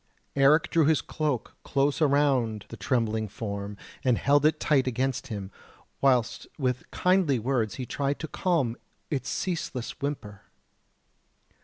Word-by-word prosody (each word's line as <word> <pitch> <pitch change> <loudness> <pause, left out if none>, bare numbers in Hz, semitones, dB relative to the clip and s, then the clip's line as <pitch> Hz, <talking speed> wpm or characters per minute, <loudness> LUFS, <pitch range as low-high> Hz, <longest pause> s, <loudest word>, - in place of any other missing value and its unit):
Eric 150 +5 +4
drew 165 -3 +4
his 155 +1 +4
cloak 150 -7 -2
close 140 +2 +1
around 135 -7 +2
the - - -7
trembling 110 0 0
form 100 -1 -5 0.3
and 125 -3 +3
held 145 +1 +4
it 155 - 0
tight 135 -4 +2
against 130 +1 -1
him, 100 -5 -5 0.5
whilst 125 -5 +2
with 125 -3 -1
kindly 180 -7 +2
words 115 -2 0
he 130 - -4
tried 140 +2 -1
to 160 - -5
calm 150 -10 0 0.3
its 135 -4 -2
ceaseless 160 -9 -3
whimper. 115 -8 -4
135 Hz, 135 wpm, -27 LUFS, 115-145 Hz, 0.5 s, Eric